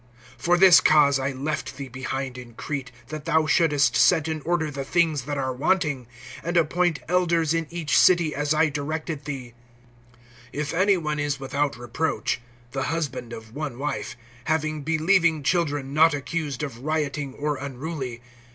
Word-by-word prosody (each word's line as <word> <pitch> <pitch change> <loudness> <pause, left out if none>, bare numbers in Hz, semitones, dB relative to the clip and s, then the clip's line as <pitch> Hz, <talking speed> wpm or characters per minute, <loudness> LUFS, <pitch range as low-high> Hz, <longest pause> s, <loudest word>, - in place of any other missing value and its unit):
(5)For 175 +1 +3
this 185 -2 +8
cause 145 -3 +5
I 135 +1 -1
left 140 0 -4
thee 140 -1 -6
behind 130 +1 -4
in 120 -2 -11
Crete, 140 -2 -5 0.2
that 155 -1 -6
thou 160 -1 +2
shouldest 150 -4 +3
set 160 -4 +4
in 160 -1 -3
order 160 -1 -1
the 135 -1 -4
things 155 -3 +1
that 145 0 -3
are 130 -1 -1
wanting, 145 -2 0 0.4
and 175 +1 -1
appoint 170 +1 +2
elders 170 -2 +2
in 165 -1 -1
each 170 -3 -1
city, 175 -4 +5
as 145 0 -2
I 155 0 +3
directed 155 0 -4
thee; 130 -5 -6 1.0
(6)if 150 +2 -2
any 190 +3 +3
one 150 -3 -2
is 145 -1 -1
without 135 -1 -1
reproach, 120 +2 -2 0.3
the 135 -1 -2
husband 140 -7 -3
of 110 -1 -9
one 145 -3 -5
wife, 145 -2 -4 0.3
having 155 -1 0
believing 160 +1 +2
children 145 -5 0
not 160 +1 +5
accused 145 -1 -3
of 130 -5 -5
rioting 145 -1 -2
or 150 0 -2
unruly. 135 -3 -5
150 Hz, 160 wpm, -25 LUFS, 135-160 Hz, 1.0 s, this